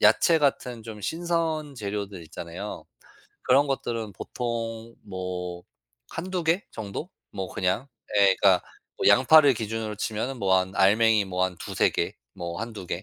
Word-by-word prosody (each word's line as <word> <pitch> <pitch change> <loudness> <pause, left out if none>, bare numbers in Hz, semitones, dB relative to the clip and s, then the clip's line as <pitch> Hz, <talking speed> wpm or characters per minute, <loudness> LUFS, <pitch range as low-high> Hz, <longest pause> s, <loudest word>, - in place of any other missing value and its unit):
야채 135 +10 +5
같은 125 -5 0
좀 110 -2 -8
신선 160 0 -1
재료들 100 -4 -4
있잖아요. 85 +5 -7 0.6
그런 140 +3 +4
것들은 115 -6 -2
보통 115 +1 -4
뭐 90 -2 -5 0.4
1-2 180 0 -4
개 170 +5 +2
정도 110 - -6 0.2
뭐 95 -2 -4
그냥 95 +9 0 0.3
예 100 -1 +5
그러니까 95 -3 +4 0.4
뭐 - - +5
양파를 140 +2 +7
기준으로 110 -1 -3
치면은 110 +6 -2
뭐 95 -2 +3
한 95 0 +1
알맹이 105 +2 +5
뭐 90 -1 -2
한 95 -1 0
2-3 - - +1
개 - - -2 0.2
뭐 85 +2 -5
1-2 110 -5 -6
개 85 +2 -4
110 Hz, 250 characters per minute, -26 LUFS, 95-130 Hz, 0.6 s, 양파를